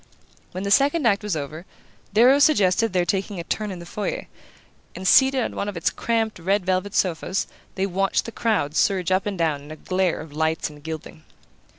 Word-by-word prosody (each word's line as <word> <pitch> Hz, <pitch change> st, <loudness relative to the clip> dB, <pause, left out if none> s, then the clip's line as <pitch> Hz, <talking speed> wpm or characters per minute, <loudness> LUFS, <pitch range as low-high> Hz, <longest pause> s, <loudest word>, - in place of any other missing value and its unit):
When 185 Hz, -, -5 dB
the 200 Hz, -, -2 dB
second 285 Hz, +6 st, +3 dB
act 200 Hz, -3 st, +3 dB
was 210 Hz, -4 st, -2 dB
over, 155 Hz, +2 st, -5 dB, 0.5 s
Darrow 250 Hz, +6 st, +5 dB
suggested 225 Hz, -, +3 dB
their 180 Hz, -1 st, +1 dB
taking 195 Hz, +2 st, -2 dB
a -, -, -4 dB
turn 210 Hz, +5 st, -3 dB
in 190 Hz, -, -6 dB
the 170 Hz, -, -9 dB
foyer; 205 Hz, +4 st, -4 dB, 0.7 s
and 185 Hz, +1 st, -4 dB
seated 265 Hz, +3 st, +5 dB
on -, -, -4 dB
one 205 Hz, -, -2 dB
of 200 Hz, -, -6 dB
its 165 Hz, -, +1 dB
cramped 225 Hz, -3 st, -1 dB
red 190 Hz, +3 st, 0 dB
velvet 185 Hz, +2 st, -1 dB
sofas 185 Hz, +1 st, 0 dB, 0.3 s
they 190 Hz, -, 0 dB
watched 195 Hz, +1 st, 0 dB
the 230 Hz, -, -6 dB
crowd 210 Hz, -12 st, 0 dB
surge 190 Hz, -2 st, +1 dB
up 185 Hz, +2 st, +1 dB
and 200 Hz, -2 st, -3 dB
down 160 Hz, -4 st, 0 dB
in 145 Hz, -, -13 dB
a 155 Hz, -, -7 dB
glare 185 Hz, +2 st, -1 dB
of 155 Hz, -2 st, -10 dB
lights 160 Hz, 0 st, -1 dB
and 150 Hz, -1 st, -14 dB
gilding. 155 Hz, -, -7 dB
190 Hz, 205 wpm, -23 LUFS, 165-210 Hz, 0.7 s, Darrow